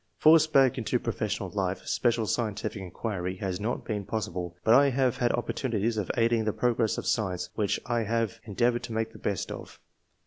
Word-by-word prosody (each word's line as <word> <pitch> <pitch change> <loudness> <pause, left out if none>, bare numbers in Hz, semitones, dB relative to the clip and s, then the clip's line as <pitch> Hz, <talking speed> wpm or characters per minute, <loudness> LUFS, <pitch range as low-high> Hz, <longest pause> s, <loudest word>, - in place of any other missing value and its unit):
Forced 155 0 +6
back 135 -2 +4
into 115 - 0
profes - - -2
sional - - -6
life, - - -2
special 120 -2 +1
scientific 105 -2 -2
inquiry 95 0 -4
has 95 -1 -3
not 110 +4 -3
been 105 -3 -2
possible; 90 -4 -4
but 110 - +5
I 140 +3 +6
have 130 -2 +1
had 120 -1 +2
opportunities 115 -2 -1
of 105 -4 -2
aiding 115 -1 +2
the 110 - 0
progress 120 -3 +1
of - - -4
science, 90 -4 -1
which 105 -3 0
I 120 -1 0
have 115 +1 -1
endea 120 +4 +2
voured 120 - -3
to 115 - -7
make 110 0 -2
the - - -12
best 100 -3 -2
of." - - -9
115 Hz, 200 wpm, -28 LUFS, 100-120 Hz, -, Forced